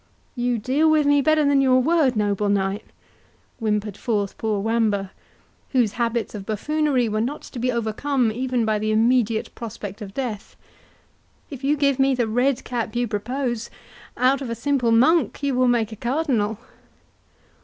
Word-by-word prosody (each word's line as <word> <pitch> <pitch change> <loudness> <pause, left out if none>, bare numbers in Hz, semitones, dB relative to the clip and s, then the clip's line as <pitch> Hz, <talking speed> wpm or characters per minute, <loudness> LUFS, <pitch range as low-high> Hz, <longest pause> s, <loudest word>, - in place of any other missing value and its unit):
"You 245 -1 0
deal 270 +8 +2
with 310 -1 +3
me 285 0 +4
better 310 +1 +3
than 280 -1 +4
your 255 -1 +4
word, 290 -2 +2
noble 205 -1 0
knight," 200 +1 0 0.7
whimpered 210 -2 -1
forth 205 -4 -2
poor 215 -2 -1
Wamba, 210 -3 0 0.6
whose 240 -5 +3
habits 235 0 -2
of 205 -2 -6
buffoonery 265 +4 0
were 215 0 -1
not 270 +6 -3
to 250 - -8
be 250 +2 0
overcome 235 +2 0
even 250 0 -1
by 215 -1 +1
the 215 +1 -2
immediate 225 0 +1
prospect 215 -3 -8
of 195 -1 -8
death; 235 -7 -5 1.0
"if 270 -1 -8
you 290 +2 +2
give 280 -2 +1
me 270 0 +3
the 245 -2 +1
red 245 +3 +1
cap 235 -3 -4
you 240 0 0
propose, 235 +2 -3 0.5
out 260 +3 +2
of 260 - -5
a 230 - -2
simple 245 -1 0
monk 290 +7 +3
you 280 -1 +1
will 255 0 +2
make 230 -3 +1
a - - -6
cardinal." 240 -4 -1
240 Hz, 165 wpm, -23 LUFS, 215-270 Hz, 1.0 s, me